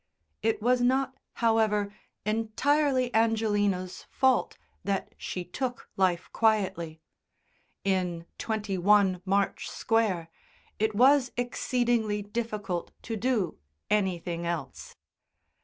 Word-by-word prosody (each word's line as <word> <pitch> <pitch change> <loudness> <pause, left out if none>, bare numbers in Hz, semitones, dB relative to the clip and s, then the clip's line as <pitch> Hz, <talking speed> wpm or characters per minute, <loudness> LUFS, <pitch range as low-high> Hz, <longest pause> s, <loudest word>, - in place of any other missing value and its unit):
It 220 -1 0
was 250 +1 +3
not, 260 +2 +2 0.3
however, 210 -2 +2 0.3
entirely 255 +4 +1
Angelina's 205 -5 +1
fault 265 -1 +2 0.3
that 195 -1 -2
she 180 -1 -5
took 245 +7 -4
life 185 -2 +1
quietly; 190 -8 +1 0.8
in 180 -3 0
21 200 -3 +2
March 195 +1 0
Square, 210 -7 0 0.5
it 215 0 +1
was 260 +2 +5
exceedingly 240 -3 0
difficult 205 -4 -3
to 225 - -3
do 220 -6 0 0.3
anything 180 -4 0
else. 170 -2 -5
210 Hz, 90 wpm, -28 LUFS, 190-235 Hz, 0.8 s, was